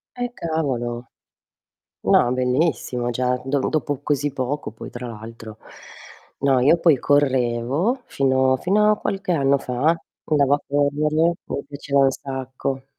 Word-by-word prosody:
Eh, 245 -1 -3
cavolo. 125 - -3 0.9
No, 120 - +4
è - - -1
bellissimo, 125 -1 0
già 125 +1 0
do 140 +1 0
dopo 145 -2 -2
così 145 -1 0
poco 140 0 -3
poi 110 - -9
tra 125 0 -7
l'altro. 110 -1 -9 0.8
No, 135 -2 +3
io 140 +7 +5
poi 165 -5 +4
correvo, 135 - +1
fino 130 -1 +2
fino 210 +8 +3
a 210 - +1
qualche 195 -3 -3
anno 140 -3 +3
fa, 135 +5 +1 0.3
andavo 145 -2 +3
a 145 - -8
correre, 150 +3 +2
mi - - -4
piaceva 140 -1 -1
un 135 -1 +5
sacco. 135 0 -5
135 Hz, 140 wpm, -22 LUFS, 125-150 Hz, 0.9 s, io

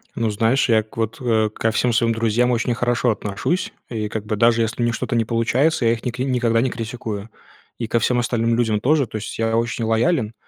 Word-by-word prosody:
Ну, 115 -1 0
знаешь, 115 +5 +1
я 110 -1 +4
к 110 - -19
вот, 115 -1 -2
э, 110 -3 +2
ко 110 0 0
всем 120 +1 +1
своим 115 0 +2
друзьям 115 +2 +1
очень 120 0 0
хорошо 120 0 +1
отношусь. 105 - -2 0.2
И 110 -3 -3
как 110 -1 -4
бы, 105 0 -1
даже 115 +1 +3
если 115 +2 -2
у 120 - +2
них 120 - 0
что-то 120 - -3
не 115 -1 +2
получается, 120 +5 +1
я 115 - +4
их 115 - -6
ник 125 0 -4
никогда 120 -3 +1
не 130 - +1
критикую. 115 -3 -5 0.5
И 115 - -3
ко 115 - +1
всем 125 +1 +1
остальным 115 -1 +1
людям 110 -3 +1
тоже. 140 +5 +2
То 110 - -5
есть 105 - -6
я 115 0 0
очень 115 0 -1
лоялен, 115 +1 +1
115 Hz, 230 wpm, -21 LUFS, 110-120 Hz, 0.5 s, я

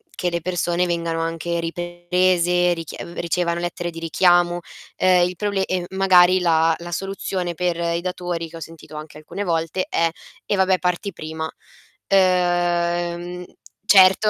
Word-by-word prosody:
che 180 - -1
le 170 -1 -2
persone 175 0 0
vengano 170 -1 -1
anche 165 +1 -2
riprese, 175 +1 +1
richie 165 -2 -7 0.2
ricevano 170 0 0
lettere 175 0 -3
di 165 - -8
richiamo. 175 +1 +3 0.4
Ehm, 180 -1 +4
il 180 - -6
proble 200 -1 -1
e 185 -2 -2
magari 185 -1 +5
la 165 -2 +3
la 175 0 -8
soluzione 190 -1 -3
per 175 0 -1
i 170 0 -1
datori, 175 -2 -3
che 165 - -13
ho - - -7
sentito 160 -1 -11
anche 150 0 -9
alcune 155 +6 -6
volte, 165 0 -1
è: 165 0 +2 0.4
"eh - - +1
vabbè 190 -1 +3
parti 180 +3 -1
prima". 160 -1 -6 0.6
Ehm, 175 -1 +1 0.4
certo, 195 0 +6
175 Hz, 145 wpm, -22 LUFS, 170-180 Hz, 0.6 s, certo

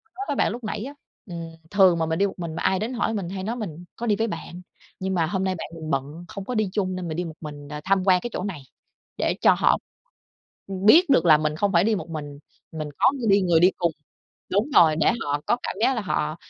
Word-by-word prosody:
nói 395 +2 -5
với 290 - -2
bạn - - +2
lúc 240 -1 -7
nãy 215 +1 -3
á, 280 +2 -7 0.3
ừm, 165 -2 -7
thường 190 -4 +5
mà 160 - 0
mình 160 0 -1
đi 200 - +3
một 195 - -5
mình 165 -2 -5
mà 175 - -4
ai 190 - +2
đến 230 +4 -3
hỏi 230 -2 -1
mình 190 -5 -3
hay 190 0 -5
nói: 230 +3 -2
"Mình 175 -6 -6
có 235 - -4
đi 210 -2 +2
với 225 - 0
bạn, 175 -1 -7 0.4
nhưng 190 0 -2
mà 165 -2 +2
hôm 190 +2 -1
nay 190 -1 0
bạn 165 - -6
mình 160 -1 -7
bận, 145 +5 -3
không 200 -2 -7
có 250 - -4
đi 215 -3 +1
chung 185 -3 -1
nên 180 -2 -5
mình 155 - -4
đi 180 - -2
một 160 -2 -8
mình 145 -2 -8
đ - - -10
tham 195 -1 +2
quan 185 -2 +4
cái 240 - -5
chỗ - - -3
này." 180 -8 -4 0.6
để - - +1
cho - - +6
họ - - +3 1.1
biết 320 +8 +7
được 265 - +5
là 155 -3 +7
mình 155 0 -1
không 200 +3 0
phải 170 +2 +4
đi 220 0 +2
một 170 - -7
mình, 145 -2 -6 0.3
mình 155 -2 -5
có - - +5
ng 250 -5 -3
đi 200 0 +5
người 170 -3 +3
đi 180 +2 +6
cùng, 170 -2 0 0.6
đúng 215 +9 +1
rồi, 155 -2 +6
để 165 - +3
họ 145 0 -1
có - - +3
cảm - - -4
giác 265 +3 +3
là - - 0
họ 155 -4 -1
185 Hz, 275 wpm, -24 LUFS, 160-210 Hz, 1.1 s, biết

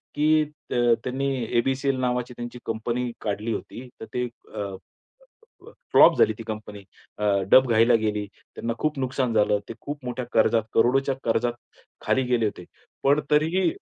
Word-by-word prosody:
की 155 +1 +4 0.3
अ, - - -1 0.3
त्यांनी 130 +2 -2 0.3
ए-बी-सी-एल 135 +2 +1
नावाची 125 -1 -1
त्यांची 120 0 -7
कंपनी 120 +2 -2
काढली 105 +2 -2
होती 125 +3 -7
तर 110 - -5
ते 125 0 0 0.3
अ, - - -4 1.1
अ, - - -11 0.2
फ्लॉप - - +7
झाली 450 - +5
ती - - -6
कंपनी 105 -2 -7 0.3
अ, 105 - -2 0.3
डबघाईला 120 -2 +6
गेली. 105 -1 -1 0.3
त्यांना 115 0 -3
खूप 155 -2 -1
नुकसान 130 -2 -1
झालं. 105 -1 +3
ते - - -4
खूप 145 -2 -7
मोठ्या 125 0 -4
कर्जात, 115 0 +3
करोडोच्या 135 +4 +3
कर्जात, 120 +1 +1 0.5
खाली 130 - +2
गेले 115 -3 +2
होते. 100 -4 -4 0.4
पण 145 +2 +4
तरीही 160 +5 +3
125 Hz, 150 wpm, -25 LUFS, 115-135 Hz, 1.1 s, फ्लॉप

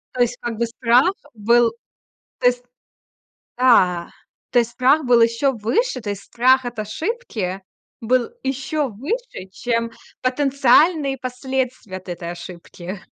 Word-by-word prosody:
То 250 - 0
есть, 245 0 +1
как 235 -2 -4
бы, 235 - +1
страх 245 +7 +3 0.2
был 235 +2 +3 0.7
то 250 - +1
есть. 245 0 +2 0.9
Да. 180 -9 +4 0.4
То - - +3
есть 235 0 -2
страх 270 +5 +3
был 240 -1 +4
ещё 230 +4 +2
выше, 255 - -1
то 210 -3 -4
есть 200 -1 -5
страх 255 +2 +3
от 240 -2 -6
ошибки 215 - -3 0.4
был 240 +1 +1
ещё 270 +2 -2
выше, 280 - -5
чем 230 +1 -1 0.3
потенциальные 275 +2 +3
последствия 255 -4 -3
от 185 - -19
этой 175 -1 -5
ошибки. 175 +2 -9
245 Hz, 135 wpm, -21 LUFS, 215-265 Hz, 0.9 s, Да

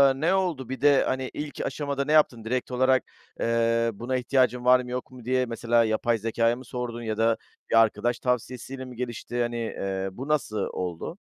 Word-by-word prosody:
eee, 135 - -8
ne 170 +4 +3
oldu? 175 -10 -1
Bir 130 -1 -5
de, 145 -1 +5
hani, 130 0 -1
ilk 150 -1 -5
aşamada 140 -2 -2
ne 150 - -1
yaptın? 130 -7 +4
Direkt 125 +2 -2
olarak, 130 +1 +3 0.4
eee, 115 0 +2
buna 120 +5 -3
ihtiyacın 125 -1 +1
var 125 0 +7
mı 125 -1 -6
yok 125 +1 -4
mu 125 -3 -12
diye 130 0 +2
mesela 115 0 +2
yapay 110 +1 +1
zekâya 115 +2 +1
mı 130 - -11
sordun 120 -2 -4
ya 110 -2 -3
da 115 0 +3 0.3
bir - - +2
arkadaş 115 +2 +1
tavsiyesiyle 125 +1 -3
mi 125 -1 -10
gelişti? 120 0 -3
Hani, 120 0 -1
eee, 95 -4 -3
bu 130 +8 -7
nasıl 145 -8 0 0.2
oldu? 90 - -4
125 Hz, 195 wpm, -26 LUFS, 115-130 Hz, 0.4 s, var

